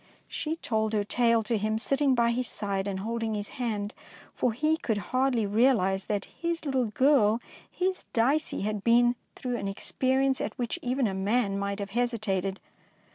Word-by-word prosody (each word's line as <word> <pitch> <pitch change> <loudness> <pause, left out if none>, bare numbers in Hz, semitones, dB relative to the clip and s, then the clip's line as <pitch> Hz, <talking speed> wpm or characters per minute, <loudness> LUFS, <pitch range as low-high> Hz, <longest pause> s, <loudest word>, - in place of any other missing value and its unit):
She 315 +1 -3
told 220 -8 -1
her 210 -1 +2
tale 230 +1 +2
to 215 0 0
him, 215 +1 0
sitting 270 +3 +2
by 235 -1 +3
his 245 +1 -1
side 200 -1 -2
and 190 -1 -3
holding 225 0 -2
his 205 0 -4
hand, 215 -4 -3 0.4
for 250 - +1
he 305 +7 +1
could 220 -8 -1 0.2
hardly 255 -4 +2
realise 200 -3 +2
that 205 -2 -2
his 335 -1 -4
little 265 -3 +1
girl, 230 -2 +3 0.3
his 370 0 -2
Dicey, 270 +7 +1
had 210 0 -2
been 240 +1 +4 0.2
through 250 -2 -3
an 200 - -3
experi 260 +6 0
ence 265 -1 +1
at 210 - -4
which 240 -2 -2
even 255 +1 0
a 200 - 0
man 200 +2 +1
might 200 0 -2
have 200 -1 -5
hesitated. 200 -5 -1
230 Hz, 180 wpm, -28 LUFS, 205-255 Hz, 0.4 s, been